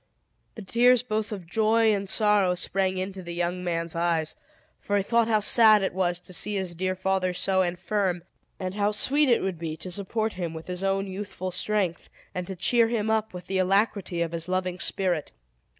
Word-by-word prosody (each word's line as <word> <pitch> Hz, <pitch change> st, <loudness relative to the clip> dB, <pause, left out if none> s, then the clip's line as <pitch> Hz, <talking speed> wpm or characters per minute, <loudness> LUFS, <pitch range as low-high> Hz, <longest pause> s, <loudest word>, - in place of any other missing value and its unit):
The 220 Hz, -, -8 dB
tears 245 Hz, +5 st, +4 dB
both 220 Hz, -3 st, -2 dB
of 195 Hz, -5 st, -6 dB
joy 220 Hz, +4 st, +3 dB
and 200 Hz, -1 st, -2 dB
sorrow 205 Hz, -4 st, +3 dB
sprang 190 Hz, +1 st, -1 dB
into 190 Hz, +1 st, -4 dB
the 170 Hz, -1 st, -7 dB
young 175 Hz, +1 st, -2 dB
man's 170 Hz, -1 st, -2 dB
eyes; 165 Hz, -2 st, 0 dB, 0.4 s
for 205 Hz, -, -1 dB
he 200 Hz, -, +1 dB
thought 230 Hz, +2 st, +2 dB
how 215 Hz, -2 st, +2 dB
sad 215 Hz, -1 st, +6 dB
it 190 Hz, -, -1 dB
was 175 Hz, -2 st, 0 dB
to 185 Hz, -, -8 dB
see 205 Hz, +4 st, 0 dB
his 190 Hz, -3 st, -2 dB
dear 185 Hz, +2 st, -2 dB
father 185 Hz, -1 st, 0 dB
so 190 Hz, +1 st, +2 dB
infirm, 180 Hz, 0 st, -1 dB, 0.4 s
and 185 Hz, -1 st, -3 dB
how 205 Hz, 0 st, +1 dB
sweet 285 Hz, +6 st, +2 dB
it 235 Hz, -, +3 dB
would 190 Hz, -3 st, -3 dB
be 160 Hz, -2 st, -4 dB
to 185 Hz, -, -7 dB
support 215 Hz, +4 st, -2 dB
him 170 Hz, -3 st, -4 dB
with 160 Hz, -, -8 dB
his 180 Hz, +1 st, -5 dB
own 195 Hz, 0 st, 0 dB
youthful 190 Hz, -1 st, -5 dB
strength, 185 Hz, -1 st, -1 dB, 0.2 s
and 180 Hz, -1 st, -4 dB
to 190 Hz, -, -5 dB
cheer 230 Hz, +6 st, +3 dB
him 220 Hz, -2 st, -1 dB
up 220 Hz, 0 st, 0 dB
with 180 Hz, -1 st, -9 dB
the 190 Hz, +1 st, -1 dB
alacrity 190 Hz, -2 st, +1 dB
of 165 Hz, -, -4 dB
his 170 Hz, +1 st, -4 dB
loving 185 Hz, 0 st, -1 dB
spirit. 180 Hz, -6 st, -1 dB
190 Hz, 200 wpm, -26 LUFS, 180-210 Hz, 0.4 s, sad